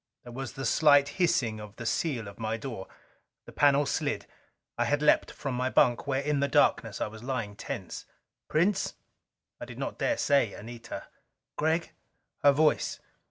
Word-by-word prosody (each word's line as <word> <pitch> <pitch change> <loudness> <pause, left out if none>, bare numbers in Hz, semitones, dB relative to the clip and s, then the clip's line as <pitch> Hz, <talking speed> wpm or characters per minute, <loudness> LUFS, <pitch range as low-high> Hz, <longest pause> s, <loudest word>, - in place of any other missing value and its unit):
There 120 - -10
was 130 -2 -5
the 135 - -5
slight 145 +3 +5
hissing 115 -10 +2
of 105 0 -10
the 115 - -8
seal 115 -1 -1
of 100 - -11
my 110 0 -2
door. 115 -5 -6 0.6
The - - -11
panel 145 0 +4
slid. - - -1 0.5
I - - 0
had 145 - +1
leaped 150 0 +3
from 135 -3 -5
my 125 +1 0
bunk 120 +1 +3
where 135 0 0
in 150 0 0
the 140 - +2
darkness 130 -6 +2
I - - 0
was 110 0 -9
lying 115 -5 -3
tense. - - -6 0.4
"Prince?" 180 +6 +1 0.6
I - - -6
did - - -10
not - - -4
dare 295 - +1
say 140 -8 +2
"Anita." 115 +2 -8 0.5
"Gregg." 160 +2 0 0.5
Her 145 - +7
voice. 150 +2 +2
135 Hz, 170 wpm, -29 LUFS, 115-145 Hz, 0.6 s, Her